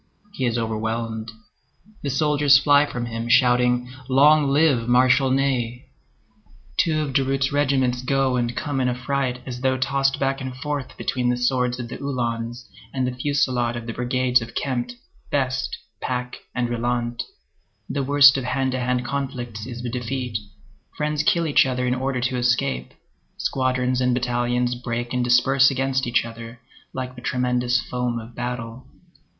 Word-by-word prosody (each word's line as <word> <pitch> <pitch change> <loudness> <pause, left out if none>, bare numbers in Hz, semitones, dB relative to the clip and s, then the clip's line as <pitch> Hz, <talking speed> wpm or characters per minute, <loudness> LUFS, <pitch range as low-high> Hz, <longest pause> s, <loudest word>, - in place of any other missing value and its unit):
He 130 -9 -1
is 120 0 0
overwhelmed. 110 0 -3 0.7
The 140 - -3
soldiers 145 0 +4
fly 145 +1 +4
from 120 -3 -4
him, 115 0 -4
shouting, 125 0 +4 0.2
"Long 145 +3 +5
live 140 -5 +3
Marshal 130 +2 +4
Ney!" 130 -3 -1 0.9
Two 155 -2 +2
of 145 -3 -3
Durutte's 135 0 +1
regiments 130 -3 +1
go 135 0 +1
and 120 -1 -1
come 145 -3 -1
in 125 - +2
affright 125 0 -2
as 125 -1 -6
though 130 0 +1
tossed 135 +1 +1
back 135 0 0
and 130 -1 -5
forth 145 0 -4
between 125 -1 -1
the 125 - +1
swords 125 0 0
of 120 - -4
the - - -7
Uhlans 120 -3 -3 0.2
and 130 -1 -1
the 125 - -1
fusillade 125 -3 0
of 120 -1 -6
the 115 - -4
brigades 125 +1 +1
of 115 - -8
Kempt, 130 - -2 0.3
Best, 130 -2 -1 0.2
Pack, 125 -1 -3 0.2
and 120 -1 0
Rylandt; 120 0 -2 0.7
the 140 +1 -2
worst 140 0 +6
of - - -5
hand 130 +1 0
to 130 - -2
hand 125 0 -1
conflicts 125 -5 -4
is 120 -1 -7
the 120 - -3
defeat; 125 -1 -4 0.6
friends 150 0 0
kill 170 0 +2
each 145 -3 +4
other 125 -1 -1
in 125 - +1
order 130 0 -2
to 125 +1 -1
escape; 120 - 0 0.4
squadrons 130 -1 0
and 125 -1 +2
battalions 120 0 0
break 120 0 -4
and 125 -1 +1
disperse 130 +2 +4
against 135 -1 0
each 120 -1 +2
other, 115 +1 -9 0.3
like 130 -1 -5
the 125 - -10
tremendous 125 0 +1
foam 125 -1 -2
of 115 +1 -8
battle. 120 0 -5
125 Hz, 160 wpm, -23 LUFS, 120-135 Hz, 0.9 s, worst